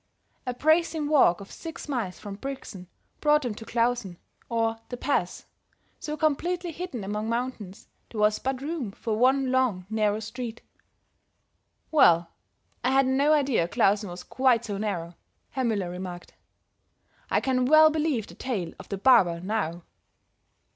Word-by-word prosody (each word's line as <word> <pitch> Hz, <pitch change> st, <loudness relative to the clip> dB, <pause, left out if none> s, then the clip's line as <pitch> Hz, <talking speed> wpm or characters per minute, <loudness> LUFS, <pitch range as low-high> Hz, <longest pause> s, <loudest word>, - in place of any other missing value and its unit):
A 250 Hz, -, -1 dB
bracing 315 Hz, +1 st, +2 dB
walk 255 Hz, -, +4 dB
of 200 Hz, -, -11 dB
six 330 Hz, -1 st, -8 dB
miles 230 Hz, -11 st, -3 dB
from 205 Hz, -2 st, -8 dB
Brixen 205 Hz, -5 st, -7 dB, 0.3 s
brought 300 Hz, 0 st, +3 dB
them 245 Hz, -4 st, -2 dB
to 225 Hz, +2 st, -10 dB
Klausen, 230 Hz, -6 st, 0 dB, 0.3 s
or 225 Hz, -1 st, 0 dB
The 245 Hz, -, -5 dB
Pass, 240 Hz, -10 st, -1 dB, 0.5 s
so 300 Hz, 0 st, -5 dB
completely 345 Hz, +4 st, 0 dB
hidden 320 Hz, -, -6 dB
among 210 Hz, +3 st, -3 dB
mountains 230 Hz, -5 st, -4 dB, 0.2 s
there 220 Hz, -, -6 dB
was 210 Hz, 0 st, +3 dB
but 265 Hz, 0 st, -3 dB
room 285 Hz, -9 st, -4 dB
for 220 Hz, +1 st, -3 dB
one 260 Hz, +3 st, +3 dB
long, 250 Hz, -9 st, +1 dB
narrow 215 Hz, -1 st, +1 dB
street. 235 Hz, +1 st, -6 dB, 1.3 s
"Well, 170 Hz, -, +5 dB, 0.5 s
I 250 Hz, -, +2 dB
had 270 Hz, 0 st, +4 dB
no 275 Hz, +3 st, +3 dB
idea 270 Hz, -, +2 dB
Klausen 200 Hz, +3 st, +2 dB
was 175 Hz, +1 st, -8 dB
quite 250 Hz, -3 st, +2 dB
so 205 Hz, -2 st, -4 dB
narrow," 180 Hz, -5 st, -3 dB, 0.4 s
Herr 265 Hz, -, -2 dB
Müller 200 Hz, -6 st, -1 dB
remarked. 180 Hz, -1 st, -7 dB, 1.0 s
"I -, -, +3 dB
can 255 Hz, -1 st, +1 dB
well 310 Hz, +3 st, +7 dB
believe 300 Hz, -8 st, 0 dB
the -, -, -13 dB
tale 200 Hz, -10 st, -4 dB
of -, -, -11 dB
the 200 Hz, -, -3 dB
barber, 190 Hz, -7 st, +5 dB
now." 175 Hz, -3 st, -2 dB
235 Hz, 150 wpm, -27 LUFS, 200-275 Hz, 1.3 s, well